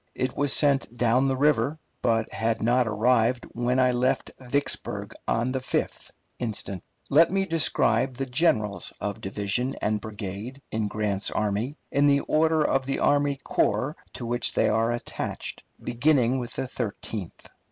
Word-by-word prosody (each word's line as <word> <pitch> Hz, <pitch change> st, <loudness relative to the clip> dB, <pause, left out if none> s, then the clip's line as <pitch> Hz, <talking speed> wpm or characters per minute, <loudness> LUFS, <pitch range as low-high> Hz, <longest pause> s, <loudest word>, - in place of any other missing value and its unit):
It 130 Hz, 0 st, -2 dB
was 145 Hz, -1 st, +1 dB
sent 140 Hz, -5 st, +2 dB
down 125 Hz, +3 st, +3 dB
the 135 Hz, -1 st, 0 dB
river, 145 Hz, 0 st, +2 dB, 0.2 s
but 115 Hz, -2 st, +1 dB
had 115 Hz, 0 st, 0 dB
not 120 Hz, +1 st, +2 dB
arrived 115 Hz, +2 st, +2 dB
when 120 Hz, +2 st, 0 dB
I 130 Hz, -1 st, +4 dB
left 130 Hz, +2 st, 0 dB
Vicksburg 135 Hz, +3 st, -2 dB
on 120 Hz, +3 st, +1 dB
the 130 Hz, -, -1 dB
5th 130 Hz, -, -2 dB, 0.3 s
instant. 100 Hz, -5 st, -3 dB, 0.3 s
Let 160 Hz, +4 st, +6 dB
me 195 Hz, +1 st, +1 dB
describe 130 Hz, -, +2 dB
the 135 Hz, -, -1 dB
generals 110 Hz, -, +1 dB
of 100 Hz, -1 st, -4 dB
division 105 Hz, +7 st, -1 dB
and 105 Hz, 0 st, 0 dB
brigade 105 Hz, +4 st, -6 dB
in 110 Hz, -1 st, -1 dB
Grant's 105 Hz, -2 st, 0 dB
army 105 Hz, +7 st, -1 dB
in 145 Hz, +1 st, +3 dB
the 140 Hz, 0 st, +4 dB
order 160 Hz, 0 st, +2 dB
of 135 Hz, -2 st, +1 dB
the 135 Hz, -, 0 dB
army 145 Hz, 0 st, +2 dB
corps 125 Hz, +9 st, 0 dB, 0.2 s
to 120 Hz, -, -6 dB
which 120 Hz, 0 st, +1 dB
they -, -, +3 dB
are 115 Hz, +2 st, +2 dB
attached, 120 Hz, -, -4 dB, 0.2 s
beginning 130 Hz, 0 st, +2 dB
with 120 Hz, -1 st, -5 dB
the -, -, -2 dB
Thirteenth. 110 Hz, -6 st, -5 dB
125 Hz, 155 wpm, -26 LUFS, 110-135 Hz, 0.3 s, Let